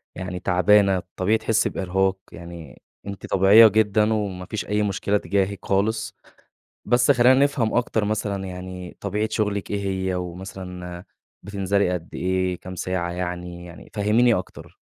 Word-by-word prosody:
يعني 90 0 -5
تعبانة، 95 +2 +3
الطبيعي 95 +4 -1
تحسي 110 0 +1
بإرهاق، 95 +1 0
يعني 85 -5 -11 0.3
أنتِ 100 -1 -7
طبيعية 100 +4 +7
جدًا، 105 +1 +2
وما 95 -4 -3
فيش 110 - -4
أي 105 +1 0
مشكلة 100 0 0
تجاهِك 100 +1 -2
خالص، 110 +4 0 0.7
بس 120 +2 +3
خلينا 125 0 +6
نفهم 140 -6 +1
أكتر 115 -3 +1
مثلًا، 105 -2 -2
يعني 90 -1 -8
طبيعة 105 +2 -1
شغلِك 105 -2 -2
إيه 100 -1 -1 0.3
هي؟ - - -1
ومثلًا 90 0 -7 0.4
بتنزلي 100 -1 0
قد 85 -2 -4
إيه، 95 0 -1
كام 95 0 -8
ساعة 85 -1 -2
يعني؟ 90 -1 -5
يعني 85 -1 -13
فهّميني 110 +3 +3
أكتر. 90 - -7
95 Hz, 140 wpm, -23 LUFS, 90-105 Hz, 0.7 s, طبيعية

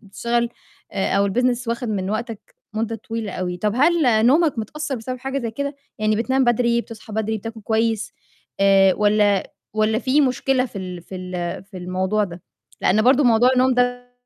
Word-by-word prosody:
بتشغل، 235 +4 -1 0.4
أو 200 +1 +1
الbusiness 245 +3 0
وَاخد 235 0 -2
من 195 -2 -2
وقتك 225 -1 -5 0.2
مدة 225 +1 -2
طويلة 225 -1 -5
أوي، 180 -1 -3
طَب 210 +3 -1
هل 260 -7 +4
نومك 300 -1 +3
متأثّر 290 +6 -4
بسبب 255 +3 -5
حاجة 270 +1 -3
زَي 235 -3 -3
كده؟ 280 +4 -4 0.2
يعني 215 0 +1
بتنام 260 +4 +1
بدري، 235 0 +2
بتصحى 225 -2 -11
بدري، 220 0 -1
بتاكل 225 +1 -8
كويس، 220 0 0 0.5
آآ، 195 -1 +5
والّا 205 -1 +2 0.2
والّا 215 +1 +2
في 265 +3 +2
مشكلة 260 -1 +1
في 205 - -8
ال 180 -2 -6
في 185 - -9
ال 180 -1 -5
في 195 -1 -13
الموضوع 185 +3 -1
ده؟ 175 -2 -9 0.4
لأن 215 +3 +3
برضه 260 +3 +4
موضوع 240 +1 +5
النوم 255 0 +3
ده 245 0 0
225 Hz, 175 wpm, -21 LUFS, 200-250 Hz, 0.5 s, آآ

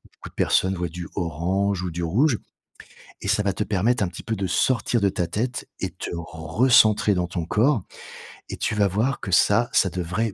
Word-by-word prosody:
beaucoup - - -11
de - - -26
personnes 95 +1 +2
voient 90 -1 -2
du 85 +2 -7
orange 90 +3 -1
ou 90 - -3
du 85 +2 -5
rouge 115 - +2 0.8
et - - -5
ça 105 - +2
va 100 - +1
te 105 - -3
permettre 105 +4 +1
un 90 - -2
petit 85 - -9
peu 110 - -2
de 95 -1 -2
sortir 120 -1 +1
de 100 - +3
ta 90 - -2
tête 120 +8 -3
et - - -2
te - - -7
recentrer 100 +7 +3
dans 90 -1 0
ton 85 -1 -3
corps 115 +3 +2 0.7
et - - -5
tu - - -1
vas 100 -1 +3
voir 110 +9 0
que 95 - -6
ça, 115 +6 +4
ça 95 - +4
devrait 90 +5 -2
100 Hz, 210 wpm, -23 LUFS, 90-110 Hz, 0.8 s, ça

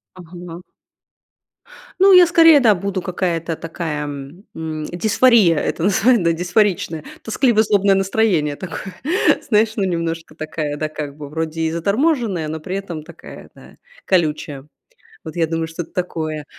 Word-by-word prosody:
Ага. 175 -1 -10 1.4
Ну, 390 +1 +6
я 360 -1 +8
скорее- 330 -3 +6
да, 225 -5 +5
буду 195 0 -3
какая-то 170 -3 -2
такая, 160 -2 -4
м, 145 +6 -8 0.5
дисфория 215 -2 +4
это 160 - -2
называе 220 +5 +3
да, 170 -4 +1
дисфоричная. 175 -2 0 0.2
Тоскливо-злобное 215 -4 +2
настроение 190 -6 +1
такое, 185 +1 -7 0.5
знаешь, 220 -1 +2
ну, 200 - 0
немножко 165 -3 -3
такая, 155 -1 -4
да, 155 +1 -3
как 150 -2 -7
бы 150 -1 -8
вроде 160 +1 -4
и 160 - 0
заторможенная, 200 - 0
но 160 +1 -5
при 185 +5 -5
этом 175 -6 -6
такая, - - -13
да, - - -16 0.3
колючая. 150 -5 -1 0.6
Вот 160 - -8
я 170 -2 +1
думаю, 165 0 -2
что-то 165 +1 -7
такое. 155 -4 -4
175 Hz, 140 wpm, -19 LUFS, 160-205 Hz, 1.4 s, я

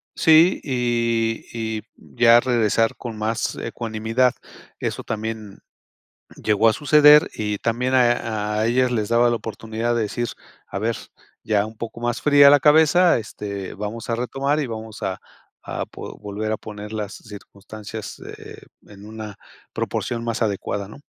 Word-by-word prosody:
sí, 160 +3 +5
y 115 -3 0
y 110 -2 -3
ya 120 -1 +4
regresar 115 -2 +1
con 115 -3 -7
más 110 +2 -2
ecuanimidad. 115 +2 -1 0.5
Eso - - -3
también 110 -2 -5 0.8
llegó 110 +1 +3
a - - +1
suceder 150 +3 +6
y 105 -1 -2
también 125 +3 -1
a 115 -4 +1
a - - +1
ellos 125 +1 +2
les 110 -3 -1
daba 120 +1 +4
la 120 - +1
oportunidad 115 +1 -3
de 115 - +1
decir: 120 +3 -3 0.4
"A - - -5
ver, 115 +2 -1 0.5
ya 105 -2 +1
un 110 0 -11
poco 115 0 -7
más 120 -1 -2
fría 145 -1 +7
la 145 0 +6
cabeza, 160 +5 +5
este, 100 -3 -6
vamos 105 +4 -6
a 115 - +1
retomar 135 +5 -1
y 145 - -1
vamos 110 -1 -8
a 95 - -2 0.4
a - - -4
po - - -10
volver 105 +1 -4
a - - -2
poner 105 0 -9
las 105 -2 -4
circunstancias, 105 +1 -10
eh, - - -11 0.3
en 100 0 -13
una 110 -1 -8 0.4
proporción 120 -2 -3
más 115 -1 -3
adecuada", 100 -2 -2
¿no? 105 - -12
115 Hz, 155 wpm, -22 LUFS, 105-120 Hz, 0.8 s, fría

